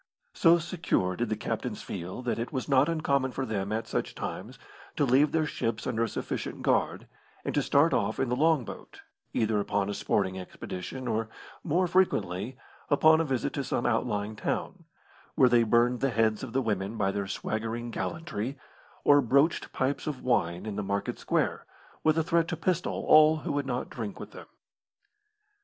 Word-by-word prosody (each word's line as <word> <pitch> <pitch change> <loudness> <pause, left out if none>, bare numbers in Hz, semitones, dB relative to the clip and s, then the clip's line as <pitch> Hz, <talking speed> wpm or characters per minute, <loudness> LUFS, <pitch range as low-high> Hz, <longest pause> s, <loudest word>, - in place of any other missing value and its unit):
So 170 -1 +5
secure 165 - -1
did 120 +1 -2
the 110 - 0
captains - - -4
feel, 90 +8 -6
that 120 -1 -1
it 115 - -3
was 130 -3 -3
not 135 +1 +4
uncommon 140 -5 0
for 135 - -2
them, 100 -3 -3
at 110 +1 -1
such - - -3
times, - - -6 0.4
to 145 - +2
leave 135 +4 +4
their 160 -1 +1
ships 115 -6 -2
under 115 -3 -1
a 115 - -1
sufficient - - -4
guard, - - +1 0.4
and - - -2
to - - +2
start - - +3
off - - 0
in 135 - +1
the 125 - +1
long 155 -2 +3
boat, - - -10 0.3
either 110 -2 +1
upon 100 0 0
a - - -2
sporting 95 -2 0
expedition 90 +6 -7
or, 110 -1 -1 0.3
more 175 +3 +2
frequently, 130 - 0 0.3
upon 160 +2 +5
a - - +2
visit 130 -6 -1
to - - -2
some - - -2
outlying 105 +1 0
town, - - -3 0.5
where 130 - +6
they 120 -1 +5
burned 120 +2 +3
the 135 +3 +1
heads 110 -3 +1
of 130 - -6
the 135 +2 0
women 105 0 -2
by 95 -2 +1
their 100 -1 -3
swaggering 115 +4 -3
gallantry, 140 -5 -4 0.5
or 145 0 +6
broached 140 +6 +2
pipes 135 +3 -1
of 145 -4 -4
wine 85 -8 0
in 105 -2 -4
the - - 0
market 100 0 -2
square, - - -1 0.4
with 155 0 +3
a 160 - +3
threat 165 +1 +2
to 165 - -3
pistol 180 +1 -1
all 155 0 +7
who - - -1
would 145 -1 -1
not 125 -1 -2
drink 110 -4 -5
with - - -8
them. - - -11
125 Hz, 185 wpm, -28 LUFS, 110-150 Hz, 0.5 s, all